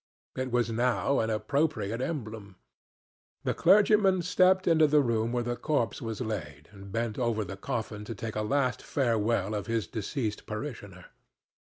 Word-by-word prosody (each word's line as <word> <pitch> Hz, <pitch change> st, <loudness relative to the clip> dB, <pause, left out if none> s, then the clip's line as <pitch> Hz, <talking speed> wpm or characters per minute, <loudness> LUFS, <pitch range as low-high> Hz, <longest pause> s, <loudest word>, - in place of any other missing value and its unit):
It 130 Hz, 0 st, -3 dB
was 120 Hz, -1 st, +1 dB
now 120 Hz, +3 st, +1 dB
an 110 Hz, -, 0 dB
appropriate 115 Hz, -1 st, 0 dB
emblem. 110 Hz, -, -5 dB, 0.9 s
The -, -, 0 dB
clergyman 195 Hz, -1 st, +4 dB
stepped 185 Hz, +1 st, +3 dB
into 160 Hz, -2 st, +5 dB
the 150 Hz, 0 st, +4 dB
room 115 Hz, -1 st, 0 dB
where 120 Hz, 0 st, 0 dB
the 120 Hz, 0 st, -2 dB
corpse 120 Hz, -7 st, -1 dB
was 115 Hz, 0 st, -4 dB
laid, 75 Hz, -, -5 dB
and 100 Hz, -1 st, -12 dB
bent 115 Hz, +1 st, -2 dB
over 115 Hz, -3 st, 0 dB
the 95 Hz, -, -6 dB
coffin 105 Hz, +1 st, -4 dB
to 115 Hz, -, -6 dB
take 110 Hz, +2 st, -5 dB
a 110 Hz, -, 0 dB
last 130 Hz, +3 st, 0 dB
farewell 115 Hz, -5 st, 0 dB
of 100 Hz, -2 st, -3 dB
his 115 Hz, -3 st, 0 dB
deceased 110 Hz, -, -4 dB
parishioner. 105 Hz, -6 st, -6 dB
115 Hz, 160 wpm, -29 LUFS, 105-140 Hz, 0.9 s, into